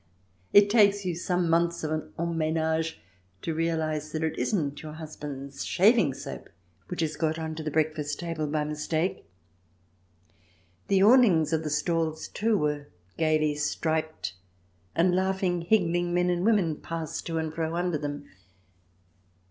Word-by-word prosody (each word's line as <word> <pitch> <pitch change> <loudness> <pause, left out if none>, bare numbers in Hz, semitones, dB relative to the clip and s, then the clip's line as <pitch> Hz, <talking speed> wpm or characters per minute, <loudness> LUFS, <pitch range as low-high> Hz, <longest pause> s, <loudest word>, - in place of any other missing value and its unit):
It 205 0 +7
takes 205 -3 +4
you 180 - 0
some 175 +1 0
months 170 +1 +1
of 155 - -2 0.3
en 170 0 -1
menage 160 0 0 0.4
to 165 - -1
realize 155 -2 -1
that 160 0 -2
it 160 - -1
isn't 145 -8 -1
your 155 -1 -8
husband's 145 -3 -7
shaving 195 - +4
soap - - -8 0.4
which 180 - -3
has 155 -1 -1
got 160 -1 0
on 160 -1 -4
to 160 - -6
the 155 - -3
breakfast 155 -1 -1
table 165 -3 -3
by 150 0 0
mistake. 155 +4 -2 1.6
The 195 -1 +4
awnings 200 - +5
of 160 0 +1
the 155 - -2
stalls, 160 +1 -1
too, 220 0 +1
were 150 -3 -1 0.3
gaily 155 -2 +2
striped, 155 - -2 0.6
and 180 +2 +3
laughing, 190 -2 0
higgling 175 -2 +1
men 180 0 +2
and 175 0 0
women 190 -8 +2
passed 165 -1 -5
to 165 -1 -2
and 160 -1 -2
fro 160 0 -2
under 175 -3 0
them. 145 0 -5
160 Hz, 150 wpm, -27 LUFS, 155-175 Hz, 1.6 s, It